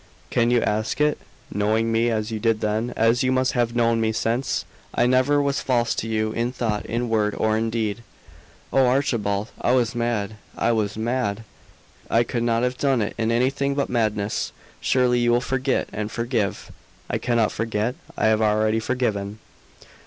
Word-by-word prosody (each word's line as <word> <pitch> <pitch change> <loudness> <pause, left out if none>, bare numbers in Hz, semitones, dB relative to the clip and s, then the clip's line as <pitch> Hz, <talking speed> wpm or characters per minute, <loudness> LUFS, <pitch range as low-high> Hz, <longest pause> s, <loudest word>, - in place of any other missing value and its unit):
"Can 120 -1 +2
you 120 -1 +3
ask 110 +5 -1
it, 150 0 +2 0.3
knowing 110 +3 +1
me 115 +1 +2
as 110 -1 -1
you 110 - -3
did 115 -1 +1
then, 110 +3 -1
as 115 +2 +3
you 130 - +2
must 130 0 +2
have 120 -2 0
known 115 -1 +2
me 110 0 +1
since? 115 +4 -1 0.3
I - - +3
never 130 +3 +3
was 140 -1 0
false 120 -3 +1
to 115 - -3
you 110 -1 0
in 115 +2 -1
thought, 110 -5 -2
in 120 +1 -1
word, 105 -2 +1
or 110 0 +2
in 115 +1 0
deed." 110 -1 -2 0.7
"Oh, 135 -1 +5
Archibald, 115 -6 0
I 120 - +2
was 120 -3 +2
mad 115 -3 -2 0.2
I 120 - +2
was 110 -2 -1
mad! 115 -2 -1 0.7
I 115 - +4
could 120 0 -3
not 115 0 +1
have 125 +1 -1
done 135 -5 +2
it 100 - -3
in 115 0 +1
anything 135 +3 +1
but 140 - -1
madness. 110 -3 -1 0.3
Surely 125 -1 +2
you 120 0 +2
will 120 - +4
forget 130 +1 -1
and 105 +1 -3
forgive!" 115 -4 -2 0.4
"I - - -2
cannot 120 -3 +1
forget. 115 +1 -1 0.2
I - - +1
have 110 0 +3
already 110 +1 +2
forgiven!" 110 -4 -2
115 Hz, 180 wpm, -23 LUFS, 110-125 Hz, 0.7 s, Oh